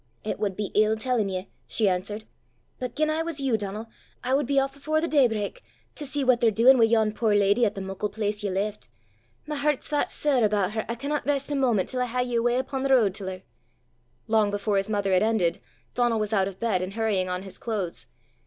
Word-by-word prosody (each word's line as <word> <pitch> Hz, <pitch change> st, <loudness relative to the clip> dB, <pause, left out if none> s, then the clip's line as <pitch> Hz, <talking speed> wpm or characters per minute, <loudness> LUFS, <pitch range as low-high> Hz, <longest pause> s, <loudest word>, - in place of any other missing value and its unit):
"It 215 Hz, -, -3 dB
wad 200 Hz, -3 st, -2 dB
be 205 Hz, -2 st, -3 dB
ill 215 Hz, +1 st, +3 dB
tellin' 225 Hz, -3 st, 0 dB
ye," 185 Hz, 0 st, -5 dB, 0.2 s
she 215 Hz, -, +1 dB
answered. 200 Hz, +4 st, -2 dB, 0.5 s
"But 250 Hz, -2 st, -5 dB
gien 310 Hz, 0 st, +1 dB
I 315 Hz, +1 st, 0 dB
was 325 Hz, -3 st, -3 dB
you, 270 Hz, -4 st, +1 dB
Donal, 210 Hz, +1 st, -4 dB, 0.4 s
I 255 Hz, +1 st, 0 dB
wad 275 Hz, -1 st, +2 dB
be 280 Hz, 0 st, 0 dB
aff 270 Hz, 0 st, +1 dB
afore 310 Hz, +3 st, 0 dB
the 335 Hz, -, -1 dB
day 285 Hz, -6 st, +4 dB
brak, 220 Hz, -, -4 dB, 0.3 s
to 295 Hz, -, -5 dB
see 285 Hz, +1 st, -1 dB
what 255 Hz, -2 st, +3 dB
they're 230 Hz, -, +5 dB
duin' 240 Hz, +4 st, +5 dB
wi' 225 Hz, -, +7 dB
yon 220 Hz, -1 st, +2 dB
puir 215 Hz, -1 st, +1 dB
leddy 205 Hz, +3 st, +4 dB
at 205 Hz, -, -4 dB
the 195 Hz, -, -5 dB
muckle 195 Hz, +2 st, -3 dB
place 210 Hz, 0 st, -2 dB
ye 205 Hz, -, 0 dB
left. 200 Hz, +3 st, -3 dB, 0.6 s
My 300 Hz, 0 st, -4 dB
hert's 290 Hz, -1 st, 0 dB
that 295 Hz, -1 st, 0 dB
sair 275 Hz, -5 st, +1 dB
aboot 205 Hz, -2 st, +2 dB
her, 220 Hz, 0 st, -3 dB
I 235 Hz, -, -1 dB
canna 285 Hz, +4 st, -2 dB
rist 280 Hz, 0 st, -1 dB
a -, -, 0 dB
moment 240 Hz, -8 st, +1 dB
till 255 Hz, -, -2 dB
I -, -, +2 dB
hae 250 Hz, +1 st, 0 dB
ye 245 Hz, -1 st, 0 dB
awa' 240 Hz, +1 st, +2 dB
upo' 265 Hz, 0 st, -4 dB
the 275 Hz, -, 0 dB
ro'd 230 Hz, -8 st, +4 dB
til 195 Hz, -1 st, -5 dB
her!" 185 Hz, 0 st, -6 dB, 0.8 s
Long 220 Hz, -2 st, +3 dB
before 205 Hz, 0 st, 0 dB
his 195 Hz, +2 st, 0 dB
mother 200 Hz, -2 st, 0 dB
had 185 Hz, -, +4 dB
ended, 215 Hz, -6 st, +1 dB, 0.3 s
Donal 240 Hz, -2 st, +1 dB
was 215 Hz, 0 st, -2 dB
out 195 Hz, -2 st, +2 dB
of 190 Hz, -1 st, -8 dB
bed, 220 Hz, -6 st, +1 dB
and 185 Hz, +1 st, -4 dB
hurrying 210 Hz, -4 st, 0 dB
on 180 Hz, +1 st, -3 dB
his 190 Hz, -1 st, -9 dB
clothes. 180 Hz, -, -4 dB
220 Hz, 240 wpm, -26 LUFS, 200-260 Hz, 0.8 s, wi